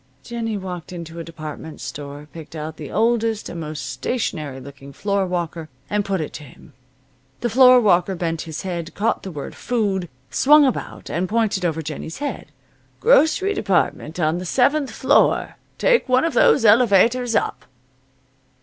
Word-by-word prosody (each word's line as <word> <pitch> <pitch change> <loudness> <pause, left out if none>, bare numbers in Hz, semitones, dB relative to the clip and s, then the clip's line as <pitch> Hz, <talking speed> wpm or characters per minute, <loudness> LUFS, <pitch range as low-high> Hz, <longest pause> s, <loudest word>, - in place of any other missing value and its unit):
Jennie 230 -2 -3
walked 180 -4 -7
into 170 -1 -8
a - - -4
department 160 -1 -8
store, 145 +2 -7
picked 165 0 -10
out 155 0 -6
the 150 -3 -7
oldest 225 0 +1
and 170 - -6
most 150 -4 -5
stationary 140 - -3
looking 140 +1 -12
floorwalker, 180 -4 -2 0.2
and 205 0 +1
put 195 -2 -1
it 155 - -5
to 150 - -8
him. 145 +2 -16 0.7
The 240 - 0
floorwalker 220 -7 +5
bent 165 -2 -2
his 160 -2 -6
head, 170 -3 -5
caught 225 +3 0
the 195 - -7
word 150 -5 -7
"food," 200 -7 -1 0.2
swung 295 +2 +6
about, 260 - -3
and 175 +3 -1
pointed 215 -4 0
over 160 -2 -1
Jennie's 155 +1 -6
head. 290 0 -4 0.5
"Grocery 400 -4 +4
department 185 - -1
on 160 +1 +1
the - - -5
seventh 270 - +2
floor. - - +2 0.2
Take 485 - +2
one 255 +4 +4
of 330 - -1
those 240 - +4
elevators 230 +2 +4
up." - - -1
185 Hz, 155 wpm, -21 LUFS, 160-230 Hz, 0.7 s, swung